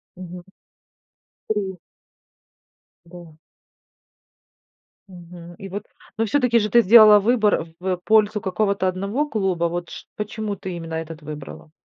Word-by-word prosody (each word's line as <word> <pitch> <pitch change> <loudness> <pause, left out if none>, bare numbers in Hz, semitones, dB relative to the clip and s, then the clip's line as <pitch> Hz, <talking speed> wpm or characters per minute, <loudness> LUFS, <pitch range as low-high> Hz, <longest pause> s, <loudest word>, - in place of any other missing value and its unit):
Мгм. 180 -1 -10 1.1
3. 195 -3 -2 1.3
Да. 170 -1 -13 1.8
Мгм 175 -1 -12
и 195 - -8
вот. 200 +2 -6 0.3
Но 225 - +1
все-таки 245 0 +2
же 210 -1 -1
ты 235 +3 +5
сделала 215 0 +8
выбор 215 -5 +2
в, 180 - -12
э, 185 -1 0
пользу 215 0 +3
какого-то 195 0 0
одного 200 +10 -2
клуба, 190 -7 -1
вот 175 0 -3
шт - - -10
почему 210 0 -4
ты 190 -1 -7
именно 165 -1 -6
этот 160 0 -6
выбрала? 150 0 -10
190 Hz, 125 wpm, -22 LUFS, 175-215 Hz, 1.8 s, сделала